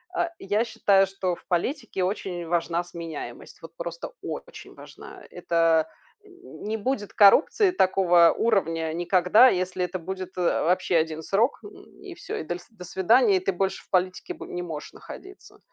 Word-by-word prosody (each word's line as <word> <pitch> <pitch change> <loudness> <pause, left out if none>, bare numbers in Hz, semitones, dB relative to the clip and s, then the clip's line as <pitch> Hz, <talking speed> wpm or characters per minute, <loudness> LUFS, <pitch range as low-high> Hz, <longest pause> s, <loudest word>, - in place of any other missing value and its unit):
а, 345 - 0
я 205 +3 0
считаю, 195 -4 +3
что 190 -2 -3
в - - -21
политике 200 - -2
очень 180 -2 -3
важна 170 0 -1
сменяемость, 165 -8 -9
вот 165 0 -12
просто 170 - -6
очень - - -8
важна. - - -13
Это 165 -1 +1 0.4
н 370 -2 -14
не 220 +1 -2
будет 220 -2 -3
коррупции 310 - +5
такого 180 - +4
уровня 165 -7 0
никогда, 180 +7 +4
если 185 -2 -1
это 185 +1 -5
будет, 185 +2 -7
э, - - -1 0.2
вообще 180 +1 +1
1 160 0 -1
срок, 220 - +1
м, 415 - -9 0.3
и 385 -3 -10
всё, 345 - -6
и - - -4
доль 175 +3 -5
"до 205 -5 -12
свидания", 200 +3 +3
и - - 0
ты 185 +1 -1
больше 190 +2 -2
в - - -32
политике 185 0 -1
бо - - -10
не 175 - -5
можешь 155 -4 -7
находиться. 385 +1 -13
185 Hz, 170 wpm, -25 LUFS, 170-215 Hz, 0.4 s, коррупции